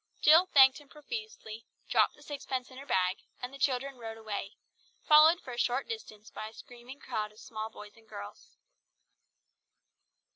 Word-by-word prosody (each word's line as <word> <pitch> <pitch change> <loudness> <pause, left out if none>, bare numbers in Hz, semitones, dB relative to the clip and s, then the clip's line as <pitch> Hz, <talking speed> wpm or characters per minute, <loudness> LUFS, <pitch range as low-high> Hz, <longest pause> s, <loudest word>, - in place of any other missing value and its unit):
Jill 325 +4 +7
thanked 265 -5 +6
him 290 -2 -18
profusely, 300 - -8 0.2
dropped - - +3
the 295 - -18
sixpence 270 -3 -5
in 260 - -10
her 280 - -11
bag, 185 0 +1 0.2
and 250 +1 -6
the 275 - -10
children 265 0 0
rode 225 -1 -7
away, 215 -2 -5 0.5
followed 310 +3 +7
for 255 - -9
a 240 - -5
short 250 +3 0
distance 220 - -8
by 215 - -6
a 220 - -12
screaming 245 +4 -12
crowd 210 -1 -3
of 210 - -22
small 220 -2 -6
boys 210 -1 -12
and 225 -1 -22
girls. 100 0 -10
250 Hz, 170 wpm, -31 LUFS, 220-285 Hz, 0.5 s, Jill